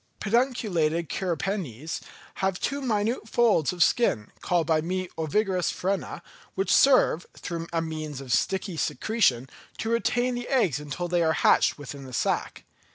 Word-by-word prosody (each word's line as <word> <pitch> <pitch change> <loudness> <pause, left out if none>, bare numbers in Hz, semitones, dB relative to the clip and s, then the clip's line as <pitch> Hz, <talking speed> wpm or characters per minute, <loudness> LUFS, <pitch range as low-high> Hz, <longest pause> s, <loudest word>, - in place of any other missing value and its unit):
Pedunculated 195 - 0
cirripedes 170 - -3 0.4
have 190 -1 0
two 280 +1 -2
minute 225 -2 -1
folds 220 - +3
of 175 -2 +3
skin, 145 - +1
called 175 -2 +1
by 160 -1 +2
me 185 +3 -2
the - - -16
ovigerous 185 +3 0
frena, 195 +1 -3 0.3
which 195 +1 +1
serve, 255 - +4
through 165 -1 -5
the 165 -1 0
means 155 -3 -5
of 135 - -8
a - - -13
sticky 190 +4 0
secretion, 155 - +1 0.3
to 225 - -2
retain 245 +2 +1
the 245 0 -4
eggs 215 - +2
until 150 +4 -4
they 175 0 +1
are 160 -1 +3
hatched - - +3
within 140 -1 -8
the 130 - -10
sack. - - -1
180 Hz, 160 wpm, -26 LUFS, 155-220 Hz, 0.4 s, serve